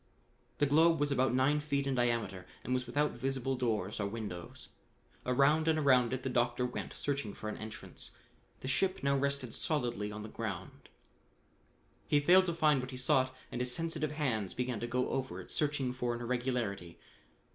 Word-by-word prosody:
The 145 - +3
globe 160 +3 +5
was 145 0 +1
about 130 -1 +3
nine 140 +3 +3
feet 140 -2 -1
in 135 - 0
diameter 115 -7 0 0.2
and 125 - -1
was 125 -1 -1
without 145 +4 +1
visible 135 +1 -1
doors 110 -6 -1
or 100 - 0
windows. 100 -5 -6 0.6
Around 140 +5 +4
and 160 -1 +4
around 130 -5 +4
it 130 -1 -2
the - - -2
doctor 120 0 +1
went, 125 - -4
searching 140 -8 -2
for 110 - -5
an - - -5
entrance. 110 +1 -7 0.4
The - - -5
ship 185 +8 +1
now 140 0 +3
rested 140 -3 0
solidly 120 - -1
on 105 0 -6
the - - -6
ground. 100 -6 -6 1.2
He 145 - +4
failed 185 +5 +6
to 170 - 0
find 150 -4 +4
what 130 - -6
he 130 - -6
sought 130 0 +3 0.2
and 125 - -3
his 125 0 -1
sensitive 165 -2 -1
hands 120 -10 -1
began 125 -3 -2
to 120 - -3
go 125 +1 0
over 130 0 -2
it - - -9
searching 140 -4 0
for 125 -2 -1
an 120 - -6
irregularity. 120 -8 -2
130 Hz, 185 wpm, -33 LUFS, 120-145 Hz, 1.2 s, failed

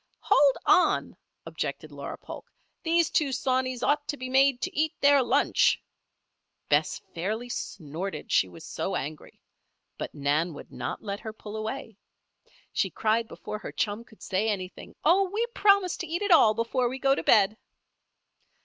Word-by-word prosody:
"Hold 280 -2 +4
on!" 360 - +3 0.3
objected - - -5
Laura - - -7
Polk. - - -10 0.3
"These 335 -1 +2
two 290 -3 +2
sawneys 255 -1 -1
ought 290 0 +1
to 290 - -3
be 255 -1 -6
made 265 0 +4
to 370 +1 -3
eat 310 0 +1
their 285 -1 +5
lunch." 245 - +3 0.9
Bess - - +2
fairly 215 +8 -3
snorted, 165 -5 -5
she 95 - +4
was 90 - -12
so - - -3
angry. 150 +3 -6 0.6
But - - -5
Nan 150 +3 0
would - - -11
not - - -5
let 200 -1 -4
her 220 - -6
pull 215 -1 -9
away. 220 0 -5 0.8
She - - +1
cried, 225 +1 0
before 215 - -7
her - - -7
chum 210 +2 -2
could 220 -2 -18
say 205 +3 0
anything: 185 -3 -5
"Oh! 375 +4 +4
we 440 +3 0
promise 400 -5 +4
to - - -5
eat 340 +5 -2
it 405 - 0
all 220 -10 +6
before 235 +2 0
we 260 - -5
go 270 0 +3
to - - -1
bed." 210 -1 +4
240 Hz, 165 wpm, -27 LUFS, 205-290 Hz, 0.9 s, all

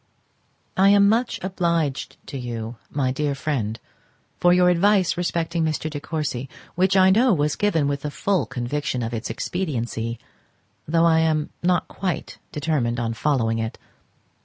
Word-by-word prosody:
I 195 +1 +5
am 200 0 +6
much 230 +4 +1
obliged 170 -6 -1
to - - -8
you, 115 -1 -5
my 135 -3 0
dear 145 +1 -1
Friend, 120 -7 -2 0.6
for 175 - +5
your 180 0 +5
advice 190 +1 +3
respecting 170 -1 -1
Mr. 155 0 -1
De 145 - -4
Courcy, 145 -4 -3 0.2
which 190 +2 +2
I 190 0 +6
know 230 +1 +4
was 150 -1 0
given 165 -9 +1
with 140 -1 -1
the 150 - -3
full 190 +5 0
conviction 125 0 -2
of 115 +1 -4
its 115 -1 -4
expediency, 120 -9 -3 0.7
though 165 +2 +3
I 160 -1 +5
am 155 -2 +1
not 180 0 +1
quite 185 -3 -4
determined 140 -6 -1
on 115 -1 -1
following 115 -3 0
it. 110 0 -3
155 Hz, 155 wpm, -23 LUFS, 125-180 Hz, 0.7 s, am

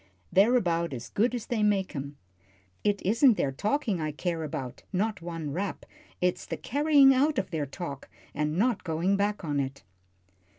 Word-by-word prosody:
They're 210 +6 +5
about 170 - +1
as 120 -1 -6
good 240 +4 +1
as 235 - -4
they 235 -3 -1
make 200 -4 +1
'em. 140 +1 -5 0.7
It 205 -1 +1
isn't 230 +4 +5
their 135 - 0
talking 210 - -1
I 155 -1 -1
care 165 +2 -3
about 135 -5 -5
not 205 0 -1
one 165 -3 -5
rap. 190 +6 -3 0.4
It's 180 0 0
the - - -4
carrying 285 0 +5
out 290 +4 +2
of 190 -2 -1
their 155 -4 -2
talk, 140 -1 -7 0.2
and 150 +2 -1
not 235 +2 +1
going 170 +3 +1
back 205 -1 -1
on 145 -2 0
it." 135 -3 -4
185 Hz, 175 wpm, -28 LUFS, 155-220 Hz, 0.7 s, They're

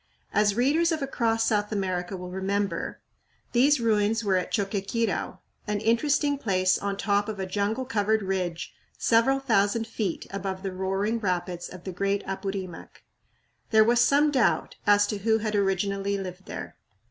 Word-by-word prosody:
As 205 -1 +3
readers 300 +8 +3
of 315 -3 -1
"Across 225 -4 0
South 210 -2 +1
America" 185 -2 -2
will 180 0 -7
remember, 190 -1 -2 0.5
these 270 +4 +4
ruins 225 0 +1
were 195 -3 +2
at 180 - 0
Choqquequirau, 205 +3 -1 0.3
an 210 -1 -1
interesting 285 +6 +1
place 185 -5 +2
on 200 -1 -3
top 205 +1 +1
of 210 -2 -5
a 190 - -2
jungle 205 +6 -1
covered 220 -3 +1
ridge 180 -3 -3 0.2
several 235 +4 +3
thousand 225 -3 +1
feet 215 -5 -3
above 195 -1 -4
the 195 - -2
roaring 195 +4 -1
rapids 180 -3 -2
of 180 -1 -11
the 190 - -5
great 200 +2 -1
Apurimac. 195 -3 -6 0.7
There 220 -1 +6
was 240 +2 +3
some 290 +2 +4
doubt 260 -5 +1
as 205 0 +6
to 205 0 -3
who 220 +2 +2
had 215 -1 -3
originally 200 0 0
lived 190 -1 -7
here. - - -7
205 Hz, 160 wpm, -26 LUFS, 190-225 Hz, 0.7 s, There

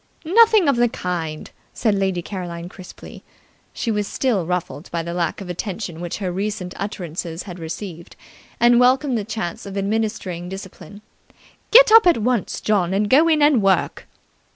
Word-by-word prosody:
"Nothing 430 0 +5
of 275 -3 +3
the 240 0 +3
kind!" 165 -6 -5 0.2
said 220 -3 +1
Lady 190 -3 -1
Caroline 175 -3 -6
crisply. 185 -1 -12 0.5
She 230 - -3
was 210 -1 -1
still 215 -11 -1
ruffled 180 -2 -4
by 170 -1 -3
the 170 +1 -5
lack 175 +3 -2
of 195 - -8
attention 180 -1 -5
which 175 -1 -4
her 190 -3 -3
recent 195 -1 -4
utterances 175 -4 -5
had 180 -3 -9
received, 170 +1 -8 0.4
and 240 +1 +5
welcomed 255 +2 +3
the 220 - -1
chance 215 -5 -5
of 200 0 -6
administering 195 -4 -2
discipline. 195 +2 -10 0.7
"Get - - +7
up 450 -3 +8
at 345 - +5
once, 230 -1 -1
John, 190 -4 +1
and 205 +1 0
go 305 +5 +6
in 310 -2 +3
and 290 -6 +4
work." 195 -2 0
195 Hz, 165 wpm, -21 LUFS, 175-235 Hz, 0.7 s, up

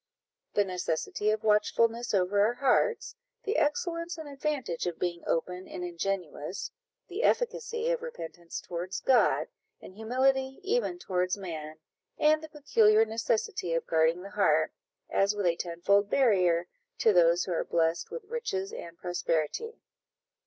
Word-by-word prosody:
the 205 - +4
necessity 180 +2 -2
of 215 0 0
watchfulness 230 +2 +2
over 195 0 +2
our 230 +3 +2
hearts 275 - +1 0.3
the 420 -3 -1
excellence 335 +3 0
and 320 -2 -7
advantage 275 - -2
of 175 - -3
being 175 -1 -2
open 180 +3 -2
and 180 - -6
ingenuous 175 -1 -3 0.4
the 380 +5 -4
efficacy 475 -1 0
of - - -1
repentance 170 - -7
towards 180 +3 -5
God, 260 -2 +3 0.3
and - - -12
humility 265 +5 0
even 400 -3 0
towards 185 - -1
man 155 -5 -6 0.4
and 310 +1 +4
the 315 - -9
peculiar 225 -7 +4
necessity 220 -6 -1
of 165 - -1
guarding 165 +2 +2
the 200 - -9
heart, 155 -6 +2 0.3
as 200 +1 +2
with 205 -2 -2
a 170 -1 +3
tenfold 185 +4 +1
barrier, 180 -10 +3 0.3
to 220 - +4
those 170 -1 +5
who - - -5
are 165 - 0
blest 165 0 0
with 480 - -6
riches 415 -3 -3
and 170 - -8
prosperity. 175 - -2
205 Hz, 145 wpm, -29 LUFS, 175-290 Hz, 0.4 s, those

